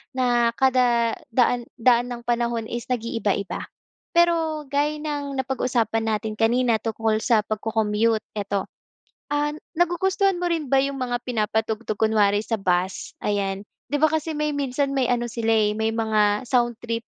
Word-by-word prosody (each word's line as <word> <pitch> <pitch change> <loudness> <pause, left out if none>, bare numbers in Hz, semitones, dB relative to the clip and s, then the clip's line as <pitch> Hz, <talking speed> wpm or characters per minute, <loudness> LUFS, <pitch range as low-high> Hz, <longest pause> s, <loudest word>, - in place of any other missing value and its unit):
na 240 -2 +3
kada 245 -3 +3 0.2
daan 240 0 +2
daan 240 0 +4
ng 240 -1 -6
panahon 235 -1 0
is 235 -1 -4
nag 245 -3 -1
iiba-iba. 210 -4 -2 0.5
Pero 330 -3 +2
gaya 295 +2 +1
ng 290 -2 -4
napag-usapan 240 -4 0
natin 215 0 -1
kanina 235 0 +3
tungkol 220 0 0
sa 220 -2 +2
pagko-commute 220 0 0
eto, 200 -2 -2 0.7
ah, 295 0 0 0.2
nagugustuhan 370 +2 +1
mo 355 - 0
rin 325 -3 -1
ba 270 +1 +3
yung 275 0 -2
mga 245 -2 -2
pinapatugtog 220 -1 -1
kunwari 210 -2 +3
sa 225 - -1
bus, 185 -1 -1
ayan? 195 -1 -1 0.3
'Di 290 0 -1
ba 315 - +5
kasi 315 0 -1
may 300 0 -1
minsan 280 -1 -1
may 260 - +2
ano 240 0 0
sila 225 0 0
eh, 215 -1 +2
may 220 0 0
mga 215 0 +1
soundtrip 235 -2 0
235 Hz, 150 wpm, -24 LUFS, 220-275 Hz, 0.7 s, ba